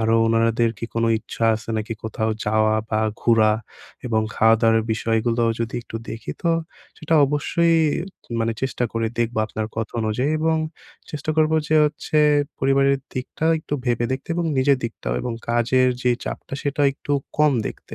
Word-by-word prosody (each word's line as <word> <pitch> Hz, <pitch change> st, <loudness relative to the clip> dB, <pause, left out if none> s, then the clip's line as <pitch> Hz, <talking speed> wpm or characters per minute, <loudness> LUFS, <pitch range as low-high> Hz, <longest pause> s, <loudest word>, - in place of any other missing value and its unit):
আরও 115 Hz, 0 st, +2 dB
ওনাদের 115 Hz, 0 st, +2 dB
কি -, -, -4 dB
কোনো 115 Hz, 0 st, +1 dB
ইচ্ছা 115 Hz, -, -4 dB
আছে 110 Hz, +1 st, -6 dB
নাকি 110 Hz, +1 st, -3 dB
কোথাও 110 Hz, 0 st, -1 dB
যাওয়া 110 Hz, 0 st, +2 dB, 0.2 s
বা 110 Hz, -, +1 dB, 0.2 s
ঘুরা, 110 Hz, -2 st, +4 dB, 0.5 s
এবং 110 Hz, -2 st, +1 dB
খাওয়া-দাওয়ার 115 Hz, 0 st, +4 dB
বিষয়গুলোও 115 Hz, +1 st, +1 dB
যদি 115 Hz, -, -3 dB
একটু 115 Hz, -, -7 dB
দেখি, 115 Hz, -, -6 dB
তো 170 Hz, -, +2 dB, 0.5 s
সেটা 160 Hz, 0 st, 0 dB
অবশ্যই 165 Hz, +4 st, +1 dB, 0.7 s
মানে 115 Hz, 0 st, +1 dB
চেষ্টা 125 Hz, -2 st, -1 dB
করে 115 Hz, 0 st, 0 dB
দেখবো 115 Hz, -1 st, 0 dB
আপনার 110 Hz, 0 st, -4 dB
কথা 110 Hz, -1 st, -3 dB
অনুযায়ী। 125 Hz, +7 st, 0 dB
এবং 160 Hz, 0 st, +2 dB, 0.5 s
চেষ্টা 150 Hz, +1 st, -3 dB
করবো 155 Hz, 0 st, +3 dB
যে 155 Hz, -, +3 dB
হচ্ছে, 150 Hz, +1 st, -1 dB, 0.4 s
পরিবারের 135 Hz, 0 st, +3 dB, 0.2 s
দিকটা 130 Hz, +4 st, -4 dB
একটু 150 Hz, -, -4 dB
ভেবে 120 Hz, -1 st, +1 dB
দেখতে 130 Hz, +4 st, -5 dB
এবং 175 Hz, -1 st, -1 dB
নিজের 135 Hz, 0 st, +3 dB
দিকটাও -, -, -4 dB
এবং 120 Hz, -, -3 dB, 0.2 s
কাজের 125 Hz, +2 st, +3 dB
যে 125 Hz, -, +3 dB
চাপটা, -, -, -6 dB
সেটাও 145 Hz, 0 st, +1 dB
একটু 145 Hz, +1 st, -5 dB, 0.3 s
কম 150 Hz, -1 st, +5 dB
দেখতে। -, -, -8 dB
120 Hz, 160 wpm, -22 LUFS, 115-140 Hz, 0.7 s, কম